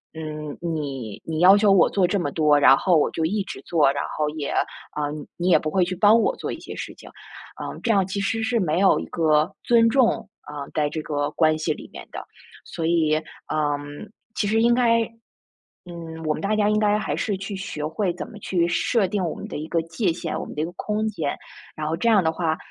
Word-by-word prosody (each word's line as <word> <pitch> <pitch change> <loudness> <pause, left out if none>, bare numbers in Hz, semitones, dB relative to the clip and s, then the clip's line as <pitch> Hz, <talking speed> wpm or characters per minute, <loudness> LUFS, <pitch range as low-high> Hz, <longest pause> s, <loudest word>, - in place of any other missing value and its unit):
嗯， 155 -2 -6
你 140 -10 -4
你 160 -1 -3
要 190 +2 +8
求 205 0 +4
我 195 - +6
做 190 -3 +2
这 200 +3 0
么 145 -5 -2
多， 150 -2 +3
然 135 -2 +7
后 175 +4 +3
我 150 - +2
就 160 - -2
一 200 +5 0
直 - - -8
做， 155 -5 +3
然 140 - -2
后 150 - +1
也 150 -2 -4 0.5
呃， 145 -1 -2 0.3
你 180 +1 0
也 - - +6
不 155 - -3
会 180 +2 +2
去 185 - -3
帮 210 +4 +5
我 480 - +1
做 - - -4
一 - - -6
些 - - -9
事 - - -6
情。 - - -14 0.5
嗯， - - -6
这 235 - +2
样 200 -3 +4
其 195 +1 -3
实 225 +3 -1
是 230 +1 +1
没 170 -3 0
有 195 - +4
一 - - -5
个 155 -2 +2
尊 230 -1 +4
重 250 -3 +2
啊， 145 -1 -7
在 150 -2 +1
这 155 - -4
个 145 -1 -1
关 155 0 +3
系 155 +1 -1
里 - - -11
面 - - -9
的。 - - -5 0.5
所 165 -2 -4
以， 160 -2 +2 0.4
嗯， 145 +1 -3 0.2
其 205 - 0
实 220 +2 +2
应 235 0 +5
该 230 -2 +3 0.8
嗯， 165 -2 -8
我 155 - +1
们 - - -6
大 200 +2 0
家 210 -1 +2
应 210 0 +2
该 210 -1 +3
还 - - -2
是 205 -3 -1
去 195 +1 -6
学 155 -6 -5
会 175 +4 -1
怎 180 - -6
么 220 - -11
去 175 -4 0
设 195 +4 +1
定 190 0 -1
我 165 - -2
们 - - -7
的 - - -6
一 155 +1 -5
个 165 - 0
界 170 +3 -1
限， 165 -1 -4
我 - - -5
们 - - -9
的 150 - -2
一 - - 0
个 170 - -7
空 215 +1 -2
间。 160 -9 -3 0.4
然 155 -1 -4
后 160 - 0
这 205 +8 +1
样 205 -5 +5
的 160 - +2
话， 160 -1 -1
170 Hz, 260 characters per minute, -23 LUFS, 155-205 Hz, 0.8 s, 要